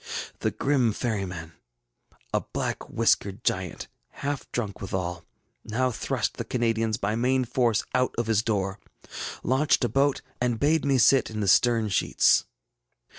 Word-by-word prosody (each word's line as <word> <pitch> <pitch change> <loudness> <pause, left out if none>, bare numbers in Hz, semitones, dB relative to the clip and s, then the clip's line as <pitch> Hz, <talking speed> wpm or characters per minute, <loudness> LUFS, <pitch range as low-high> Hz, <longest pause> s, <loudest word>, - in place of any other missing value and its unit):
ŌĆ£The - - -2
grim 130 -6 +2
ferryman, 95 -8 -3 0.8
a - - +2
black - - -3
whiskered 100 +3 +1
giant, 90 -2 -2 0.4
half 145 -1 -3
drunk 105 -5 -3
withal, 90 -2 -3 0.4
now 125 +4 0
thrust - - -2
the - - -2
Canadians 115 -2 0
by 100 +2 -1
main 130 +2 +1
force 120 -2 +1
out 130 0 +1
of 120 - 0
his 110 -2 +2
door, 100 -3 -1 0.6
launched 135 +2 +2
a 120 - +1
boat, 135 +4 +1 0.2
and 120 -2 0
bade 155 +3 +2
me 135 -1 +3
sit 130 +2 +5
in 110 -1 -5
the 100 - -1
stern 115 +3 +4
sheets. 95 - +3
115 Hz, 145 wpm, -26 LUFS, 100-130 Hz, 0.8 s, sit